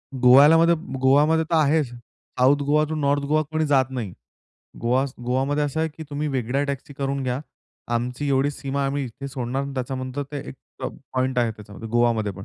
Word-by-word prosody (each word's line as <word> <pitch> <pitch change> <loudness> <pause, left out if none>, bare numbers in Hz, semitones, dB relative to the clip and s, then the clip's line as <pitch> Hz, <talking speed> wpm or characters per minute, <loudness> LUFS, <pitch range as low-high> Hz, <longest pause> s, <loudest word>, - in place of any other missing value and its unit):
गोव्यालामध्ये 145 +7 +6 0.3
गोवामध्ये 150 +5 +4
तर 170 - +2
आहेच, 155 -1 +3 0.5
south 130 +3 +5
Goa 150 +2 +3
to 160 - -2
north 145 -1 +1
Goa 155 +2 +2
कोणी 155 0 +1
जात 135 -3 +4
नाही. 120 -8 -5 0.7
गोवा 125 +3 +2 0.2
गोवामध्ये 135 +4 +1
असं 145 +2 -2
आहे, 160 - +1
की 160 +1 -10
तुम्ही 150 +1 -2
वेगळ्या 130 0 -1
टॅक्सी 140 0 -5
करून 140 0 -2
घ्या. 130 0 -2 0.5
आमची 125 +4 -2
एवढी 135 +1 +2
सीमा 140 0 -4
आहे, 135 - +1
आम्ही 140 0 -2
इथे 130 +3 -7
सोडणार. 130 0 -3
त्याच्यानंतर 130 +1 -3
ते 145 - -3
एक - - -7 0.3
प - - 0 0.3
पॉइंट 130 0 0
आहे, 120 -2 +2
त्याच्यामध्ये 105 0 -10
गोवामध्ये 115 -3 +1
पण. 95 +1 -9
135 Hz, 185 wpm, -23 LUFS, 125-145 Hz, 0.7 s, गोव्यालामध्ये